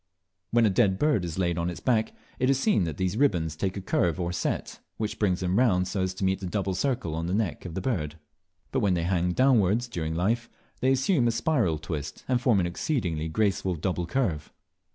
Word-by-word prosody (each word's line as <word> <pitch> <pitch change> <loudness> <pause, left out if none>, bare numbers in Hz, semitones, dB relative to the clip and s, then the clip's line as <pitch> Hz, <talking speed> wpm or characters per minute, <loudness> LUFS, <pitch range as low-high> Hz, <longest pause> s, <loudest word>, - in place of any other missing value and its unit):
When 115 0 +4
a 105 - +3
dead 95 -2 +3
bird 150 -8 +2
is 85 -1 -4
laid 85 -2 0
on 85 +1 0
its 90 - -6
back, 115 -4 +1 0.3
it 130 - +2
is 135 -1 +3
seen 135 - +2
that 80 -3 -4
these 95 +2 -1
ribands 85 - +1
take 95 +4 -2
a - - -4
curve 85 -2 0
or 85 -1 -1
set, 85 -1 -3 0.2
which 110 -1 -3
brings 95 -4 +1
them 90 +3 +1
round 90 -8 +3
so 95 +1 -2
as 95 0 -1
to 95 - -2
meet 95 +1 0
in 95 - -3
a - - -4
double 95 -1 -1
circle 120 - -1
on 80 +1 -2
the 90 - 0
neck 100 -8 -2
of 85 -2 -6
the 95 - -2
bird; 85 - -2 0.6
but 130 - +1
when 100 -6 +2
they 85 - -1
hang 90 0 +1
downwards, 120 -3 +3
during 80 -8 -3
life, 115 +7 0 0.3
they 130 - +2
assume 135 0 +2
a - - +3
spiral 115 - +1
twist, 75 -2 -6
and 125 -1 +1
form 120 -5 +3
an 90 - +1
exceedingly 85 - -2
graceful 95 +1 0
double 90 +1 -2
curve. 85 - -1
95 Hz, 230 wpm, -27 LUFS, 85-120 Hz, 0.6 s, When